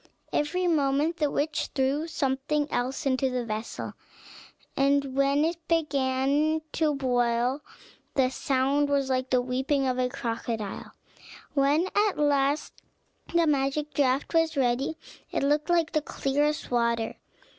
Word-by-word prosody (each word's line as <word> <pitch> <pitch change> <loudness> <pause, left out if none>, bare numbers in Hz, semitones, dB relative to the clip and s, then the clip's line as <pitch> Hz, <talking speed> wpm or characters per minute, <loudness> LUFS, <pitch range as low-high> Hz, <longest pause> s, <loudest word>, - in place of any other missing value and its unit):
Every 345 +5 0
moment 300 0 +1
the 300 -3 +1
witch 295 +2 -1
threw 280 +4 +1
something 290 0 -1
else 255 +5 -2
into 265 0 +1
the 250 -1 -2
vessel, 220 0 -5 0.8
and 275 -1 +2
when 275 +2 +3
it 335 0 -4
began 290 0 +1
to 310 -2 +1
boil, 245 0 +1 0.5
the 260 -2 +3
sound 275 +2 +1
was 275 -2 +1
like 255 0 0
the 250 -1 +2
weeping 265 +2 0
of 255 -1 0
a 250 0 +1
crocodile. 230 -4 -4 0.6
When 290 +5 +3
at 415 -1 +2
last 285 0 +1 0.6
the 340 -1 +3
magic 290 0 0
draught 275 +1 +1
was 325 -2 +2
ready, 265 +4 +1 0.3
it - - -1
looked 295 +2 +1
like 340 -2 +2
the 310 - +1
clearest 290 +1 -1
water. 235 -2 0
275 Hz, 135 wpm, -27 LUFS, 260-300 Hz, 0.8 s, when